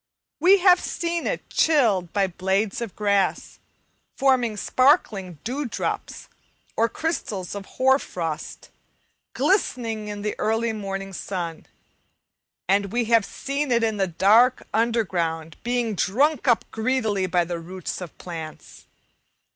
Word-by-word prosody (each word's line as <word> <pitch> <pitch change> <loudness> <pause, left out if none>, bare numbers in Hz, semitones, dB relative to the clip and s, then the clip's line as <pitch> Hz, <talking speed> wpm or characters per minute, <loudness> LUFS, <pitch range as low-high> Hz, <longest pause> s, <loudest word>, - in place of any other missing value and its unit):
We 380 +3 +6
have 365 -1 +6
seen 340 0 -2
it - - -3
chilled 220 - +2
by 200 -1 +2
the 185 - -7
blades 190 +4 0
of 230 -5 -5
grass, 200 -2 0 0.6
forming 250 -5 +2
sparkling 205 - +2
dew 275 +5 -3
drops - - -4 0.5
or 230 +1 +2
crystals 215 - -3
of 200 -1 -7
hoar 265 +1 +4
frost, 165 - -6 0.6
glistening 230 - 0
in 205 -1 -6
the 210 - -1
early 225 +1 0
morning 195 -2 -5
sun; 175 -4 -5 1.0
and 200 +1 +2
we 240 +1 0
have 225 -2 +6
seen 280 0 -3
it 235 -1 +3
in 220 -2 0
the 195 -1 +1
dark 220 +9 +4
underground, 175 -9 0
being 240 -2 -1
drunk 270 - +1
up 240 -2 +3
greedily 220 -4 0
by 175 -1 +1
the 170 0 -4
roots 185 +2 -6
of 175 -4 -9
plants. 155 - -9
210 Hz, 130 wpm, -24 LUFS, 185-245 Hz, 1.0 s, We